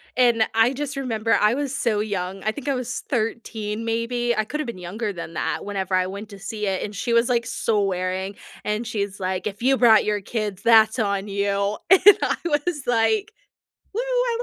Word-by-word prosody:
and 240 -3 +4
I 225 +2 +4
just 280 +1 -4
remember 230 -4 -1
I 210 +2 +3
was 280 -1 -2
so 220 -5 0
young, 195 -2 -3
I 215 - +1
think 285 +4 -9
I 275 - +1
was 250 -1 -3
13 220 -2 -2
maybe, 235 +1 -1
I 215 - +1
could 300 +6 -4
have 300 - -3
been 235 - -5
younger 205 +5 -4
than 170 -3 -7
that - - -2
whenever 190 -2 -2
I 185 - +2
went 200 +3 -7
to 200 - -10
see 210 +1 -4
it, 190 -1 -1
and 205 -1 -6
she 235 +5 -2
was 235 +1 +4
like 235 -2 0
swearing, 195 -4 -1 0.3
and 210 +3 -2
she's 205 -3 -3
like, 185 +1 -2
"If 210 +2 -6
you 270 +1 +4
brought 225 -4 +6
your 210 -1 0
kids, 205 -2 -4
that's 220 0 +5
on 200 -2 0
you." 200 0 0
And 380 +1 +7 0.2
I - - +1
was 295 -1 -1
like, 390 - +1 0.6
"Woo, 445 - -1
I - - 0
220 Hz, 205 wpm, -23 LUFS, 200-245 Hz, 0.6 s, And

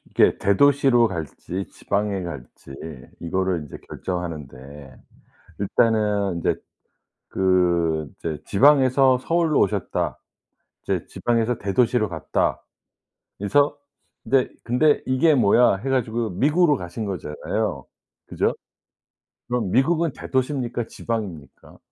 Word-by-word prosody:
이게 - - +3
대도시로 130 +3 +4
갈지 90 +2 -5
지방에 100 -1 -2
갈지 70 -5 -9 0.5
이거를 95 +1 -1
인제 75 - -10
결정하는데 75 -6 -7 0.6
일단은 105 -3 +1
이제 - - +1 0.7
그 85 -4 +1
이제 80 -2 -5
지방에서 130 +1 +4
서울로 165 +2 +1
오셨다 100 - -1 0.6
이제 - - -2
지방에서 120 0 -1
대도시로 110 +2 +1
갔다 80 -3 -1 0.8
그래서 145 +9 +2 0.5
근데 135 -2 +2 0.2
'근데 145 +5 +2
이게 135 +5 +3
뭐야.' 120 -3 +4
해 105 +8 -6
가지고 120 -3 0
미국으로 150 - +3
가신 90 +2 -6
거잖아요. 90 -6 -3 0.4
그죠? - - 0 0.9
그럼 120 -6 -1
미국은 160 - +2
대도시입니까 130 -3 -2
지방입니까? 100 -10 -6
105 Hz, 265 characters per minute, -23 LUFS, 90-130 Hz, 0.9 s, 대도시로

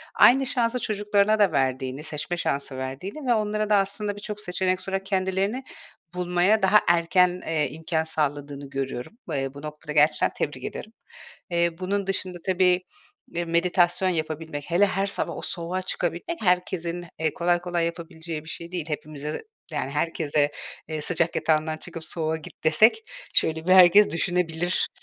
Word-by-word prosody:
aynı 270 +2 +6
şansı 245 0 +1
çocuklarına 210 0 +1
da 200 -4 +5
verdiğini, 130 0 -1
seçme 160 +3 -3
şansı 140 -4 -2
verdiğini 180 - -5
ve 240 - +5
onlara 215 -1 0
da 210 - +5
aslında 200 +1 0
birçok 210 0 -6
seçenek 185 -1 -1
sunarak 195 0 -3
kendilerini 195 +5 0 0.5
bulmaya 180 +4 +2
daha 195 +2 +6
erken, 175 +1 +3
eee, 155 -3 +1
imkân 160 +1 -1
sağladığını 145 -2 -3
görüyorum. 135 - -5
Eee, 135 -1 -2
bu 140 - -10
noktada 150 0 -7
gerçekten 150 +1 +4
tebrik - - -3
ederim. 220 - -6 0.6
Eee, 170 0 +3
bunun 195 +1 -1
dışında, 185 -2 -1
tabii, 185 -1 +3 0.5
eee, 175 0 -1
meditasyon 175 +2 +2
yapabilmek, 155 -3 -3
hele 185 +4 +5
her 195 0 -1
sabah 200 - -2
o - - -5
soğuğa 180 +2 -2
çıkabilmek 180 - -3
herkesin, 180 -2 0
eee, 160 -1 0
kolay 175 0 +1
kolay 175 -1 -1
yapabileceği 165 -2 -6
bir 160 - -10
şey 170 +1 -5
değil. 175 -4 -3
Hepimize, 150 0 -5 0.3
yani, 135 -2 -2
herkese, 150 -1 0 0.4
eee, 155 -1 -3
"Sıcak 170 +1 +1
yatağından 155 0 +1
çıkıp 165 -1 -7
soğuğa 160 -1 -2
git." 160 - -13
desek 215 - +5 0.3
şöyle 160 +1 +2
bir 185 - +6
herkes 190 +3 +8
düşünebilir. 175 0 0
175 Hz, 155 wpm, -25 LUFS, 155-190 Hz, 0.6 s, herkes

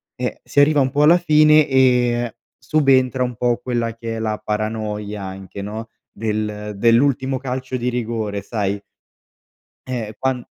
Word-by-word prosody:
Eh, - - -4
si - - 0
arriva 145 0 +4
un 130 - +1
po' 145 +1 +2
alla 165 +4 +7
fine 155 -2 +5
e 125 -3 +2 0.2
subentra 130 -4 +2
un 125 -1 -3
po' 120 +1 +1
quella 120 -2 -2
che 115 -1 -5
è - - -4
la 110 -1 -2
paranoia 105 -1 -3
anche, 95 +1 -8
no, 110 +3 -6 0.2
del 105 -1 -3
dell'ultimo 130 +4 +2
calcio 130 0 -4
di 125 0 -1
rigore, 110 -4 -3
sai 100 -1 -2 1.1
eh, 115 -4 -4
quan 130 -2 -1
120 Hz, 150 wpm, -20 LUFS, 105-130 Hz, 1.1 s, alla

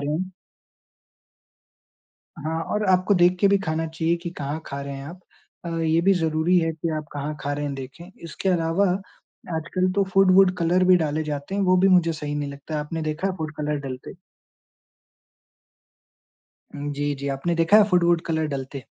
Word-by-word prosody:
रहे 145 +1 -2
हैं। 185 +3 -3 2.1
हाँ, 160 +2 -3
और 210 +5 -2
आपको 185 +2 +3
देख 180 0 +4
के 200 - +5
भी 200 - +4
खाना 160 0 -1
चाहिए 160 +1 -1
कि 170 - -4
कहाँ 145 +2 -3
खा 140 - -5
रहे 140 0 -6
हैं 135 0 -7
आप। 175 +4 -10 0.4
अ, - - -4
ये 160 0 +2
भी 195 +3 +4
ज़रूरी 165 +1 +2
है 165 -1 0
कि 160 +1 -4
आप 155 - -4
कहाँ 145 +1 -4
खा 145 - -2
रहे 145 +1 -3
हैं 145 -1 -3
देखें। 135 +7 -9
इसके 170 +3 -4
अलावा 170 +2 +2 0.7
आजकल 185 +3 -1
तो 200 - +3
फूड-वूड 190 -1 +5
कलर 175 +2 +2
भी 185 0 +6
डाले 155 -2 -1
जाते 145 +4 -4
हैं, 200 - 0
वो 185 -1 +4
भी 190 +2 +4
मुझे 175 -3 +4
सही 150 -2 -5
नहीं 145 -1 -3
लगता। 145 +2 -5
आपने 160 +2 -4
देखा 155 +4 -2
है 185 - -4
फूड 155 -3 -5
कलर 150 0 -1
डलते? 130 +6 -8 2.6
उम, 145 0 -4
जी, 145 0 -1
जी। 140 +1 -5
आपने 170 +6 -1
देखा 165 +5 +4
है 215 - +7
फूड-वूड 175 -2 +3
कलर 160 -1 0
डलते? 135 0 -7
165 Hz, 185 wpm, -24 LUFS, 150-180 Hz, 2.6 s, है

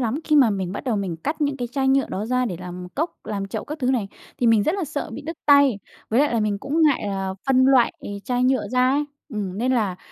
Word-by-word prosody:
lắm, 245 +5 -1
khi 305 - +3
mà 260 -6 +6
mình 190 -2 -2
bắt - - -6
đầu 235 -5 0
mình 185 -5 -3
cắt 300 - -4
những 285 -1 0
cái 245 -2 -4
chai 270 -1 +1
nhựa 270 0 +3
đó 205 +3 -3
ra 250 +1 +1
để 185 -8 -3
làm 180 0 -7
cốc, 320 +5 -1
làm 200 -2 -3
chậu - - -5
các 300 +1 -6
thứ 255 -1 +1
này, 225 -7 0 0.3
thì 240 - +1
mình 225 -3 +5
rất 315 - +1
là 385 -4 -2
sợ 290 -5 -4
bị 275 +6 -7
đứt 325 +2 -6
tay. 280 -6 +5 0.3
Với 235 +5 +3
lại 290 -5 +2
là 225 - +2
mình 205 -1 0
cũng 295 +8 0
ngại 295 -4 +3
là 195 -1 -3
phân 260 -1 +4
loại 260 -2 +4 0.3
chai 250 -1 0
nhựa 260 0 +1
ra 255 +1 +2
ấy, 290 +2 +1 0.2
ừm, 205 -5 -4
nên 255 +2 +1
là, 210 -7 0
250 Hz, 275 wpm, -23 LUFS, 205-280 Hz, 0.3 s, mà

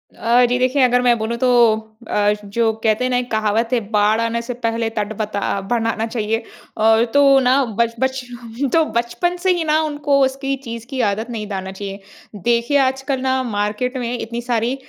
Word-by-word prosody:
अ, 240 +2 +3
जी 245 - +1
देखिए 255 +2 +2
अगर 250 0 +3
मैं 245 -1 +3
बोलूँ 225 +1 -3
तो 255 - +1 0.6
अ, 205 0 +2
जो 225 +3 +1
कहते 220 +2 +2
हैं 255 - 0
ना 250 - +2
एक 245 0 -3
कहावत 220 +1 +1
है, 245 - +3
"बाढ़ 210 +1 +3
आने 230 0 -1
से 240 +1 -5
पहले 230 0 0
तट 210 0 -1
बता 210 -1 -3
अ, 200 - -1
बनाना 225 -1 0
चाहिए।" 225 -1 -1 0.4
अ, 220 +1 +4
तो 275 -1 +6
ना 260 +2 +3 0.2
बच 230 0 +1
बचपन 250 -1 -3
तो 325 - +5
बचपन 295 +10 -1
से 370 +1 +1
ही 345 -2 -1
ना 310 0 +2
उनको 290 -2 0
उसकी 270 +1 -2
चीज़ 230 -1 -6
की 265 -2 -2
आदत 220 +4 -4
नहीं 220 -3 -5
डालना 190 -2 -5
चाहिए। 195 0 -7 0.5
देखिए 235 +4 +2
आजकल 265 0 0
ना 260 0 +1
मार्केट 215 +3 -2
में 245 -1 -3
इतनी 235 0 -5
सारी 240 0 -1
235 Hz, 200 wpm, -19 LUFS, 220-260 Hz, 0.6 s, तो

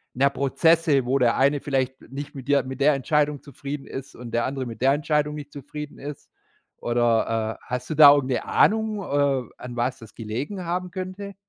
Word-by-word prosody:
na 130 +3 +3
ja, - - +5
Prozesse, 150 0 +2
wo 130 +2 +2
der 120 -2 +3
eine 140 +2 +3
vielleicht 130 -2 -1
nicht 140 +2 -8
mit 135 -1 -9
dir 140 -2 +3
mit 130 +1 -7
der 150 +2 +5
Entscheidung 150 +1 0
zufrieden 140 0 -7
ist 135 0 -8
und 120 -1 -9
der 120 +1 +1
andere 135 0 -3
mit 115 -1 -8
der 135 +1 +5
Entscheidung 150 0 0
nicht 145 -1 -8
zufrieden 150 +1 -8
ist. 145 +1 -8 0.5
Oder, 115 -2 0
äh, - - -21
hast 125 0 -4
du 155 - -2
da 145 -1 +10
irgend 135 -2 0
'ne 125 - -1
Ahnung, 220 -1 +2
äh, 140 -6 0
an 125 -1 -8
was 125 +2 -1
das 115 -2 -14
gelegen 130 - -5
haben 180 +1 -3
könnte? 185 +2 -6
140 Hz, 205 wpm, -24 LUFS, 125-150 Hz, 0.5 s, da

